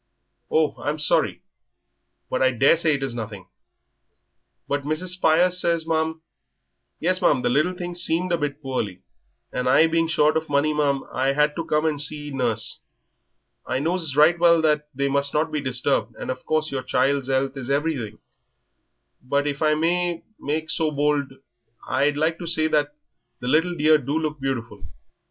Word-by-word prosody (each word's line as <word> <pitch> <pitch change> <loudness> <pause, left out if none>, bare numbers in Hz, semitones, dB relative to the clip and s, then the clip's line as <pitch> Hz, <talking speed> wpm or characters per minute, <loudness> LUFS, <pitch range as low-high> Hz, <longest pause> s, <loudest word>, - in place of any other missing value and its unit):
"Oh, 155 -1 +2
I'm 150 +1 -2
sorry. 150 -1 +1 0.8
But 130 - -2
I 130 - +5
daresay 150 +5 +3
it 140 - -4
is 135 -3 -2
nothing." 110 -5 -7 1.2
"But 145 0 -1
Mrs. 155 +5 -3
Spires 180 0 +3
says, 170 -1 +1
ma'am 160 0 -1 0.4
" - - -53
"Yes, 185 +1 +2
ma'am, 130 -7 +3
the - - +2
little 155 +7 +2
thing 175 -1 -5
seemed 175 +1 0
a 170 - +2
bit 145 0 -4
poorly, 105 -9 -3 0.5
and 125 0 -1
I 155 - +6
being 165 0 +1
short 155 -2 +2
of 160 0 -2
money, 145 +2 +2
ma'am, 140 -2 0
I 135 +1 +1
had 150 +1 +2
to 165 - -3
come 150 +1 0
and 150 -2 0
see 150 0 -4
nurse. 125 -5 -1 0.9
I 130 - -1
knows 160 0 0
right 160 +4 +5
well 170 -1 +5
that 150 -1 +1
they 140 +1 0
must 140 +1 0
not 155 +1 +1
be 150 -1 -2
disturbed, 125 -3 0
and - - -4
of 130 - -8
course 155 0 0
your 135 -1 -2
child's 135 0 0
'ealth 135 +1 0
is 135 -2 -6
everything; 140 -7 -1 1.0
but 140 +3 0
if 145 0 -3
I 155 -1 +3
may 170 +2 0 0.2
make 155 +2 -2
so 160 -1 0
bold 145 -1 0 0.6
I'd 145 +1 +1
like 160 +2 0
to 170 - -6
say 160 -1 +2
that 150 -1 0 0.4
the 125 - -6
little 165 +6 +2
dear 155 0 +4
do 140 +3 -2
look 155 -2 -3
beautiful. 120 -7 -4
150 Hz, 175 wpm, -23 LUFS, 135-160 Hz, 1.2 s, I